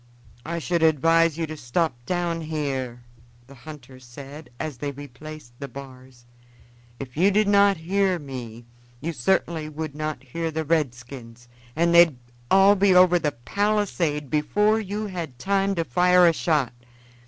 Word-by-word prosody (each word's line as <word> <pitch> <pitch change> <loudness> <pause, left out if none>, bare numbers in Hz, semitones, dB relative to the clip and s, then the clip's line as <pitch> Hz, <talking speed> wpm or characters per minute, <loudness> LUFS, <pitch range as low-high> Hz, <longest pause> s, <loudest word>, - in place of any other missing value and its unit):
"I 170 +3 -4
should 170 +1 -1
advise 165 +1 +3
you 165 - -1
to 155 0 -7
stop 155 +4 -1
down 175 -2 -1
here," 135 -6 -4 0.4
the 135 - -15
hunter 135 -2 -12
said 135 +5 -11
as 155 -6 -5
they 145 - -3
replaced 145 0 -10
the 140 - -5
bars. 130 -2 -12 0.7
"If 130 -2 -8
you 180 +6 +4
did 210 +1 +2
not 200 -1 +4
hear 185 +3 0
me 125 -6 -8 0.3
you 165 +5 -4
certainly 160 +2 0
would 155 -1 -6
not 155 -3 -4
hear 165 +6 -4
the 160 0 -3
redskins, 125 -5 -3 0.3
and 170 +2 +2
they'd 170 -5 +6 0.3
all 195 +1 +6
be 195 -1 +3
over 180 -1 +6
the 150 -3 -1
palisade 170 - -1
before 210 +9 +2
you 210 +1 -4
had 170 -10 -6
time 195 +5 0
to 165 - 0
fire 180 +6 +4
a 170 - +5
shot. 150 -7 0
155 Hz, 155 wpm, -24 LUFS, 135-175 Hz, 0.7 s, they'd